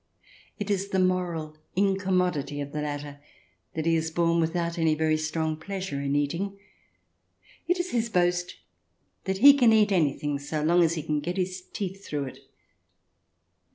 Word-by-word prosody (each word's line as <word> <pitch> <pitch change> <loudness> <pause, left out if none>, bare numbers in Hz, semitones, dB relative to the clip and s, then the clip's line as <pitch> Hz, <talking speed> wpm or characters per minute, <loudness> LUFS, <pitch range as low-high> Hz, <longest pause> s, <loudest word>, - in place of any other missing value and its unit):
It 205 0 -3
is 195 0 0
the 190 - 0
moral 180 -4 0 0.2
incommodity 185 -6 +1
of 140 0 -5
the 150 - -3
latter 145 -1 -5 0.6
that 160 -1 -2
he 165 0 +3
is 160 0 0
born 170 0 +2
without 170 +1 -1
any 160 -1 +3
very 155 0 +2
strong 155 0 -1
pleasure 185 -3 -5
in 140 0 -1
eating. 170 +8 -1 1.1
It 355 +1 +1
is 355 0 -2
his 235 -1 0
boast 180 -2 +1 0.7
that 190 0 -1
he 280 +7 +9
can 250 -5 +5
eat 215 -2 +4
anything 145 -4 +1
so 150 +2 -3
long 170 +3 +4
as 165 0 +3
he 155 - -4
can 150 0 -1
get 175 +5 -4
his 185 0 -2
teeth 195 0 -5
through 145 -5 -3
it. 130 - -8
170 Hz, 165 wpm, -27 LUFS, 155-190 Hz, 1.1 s, he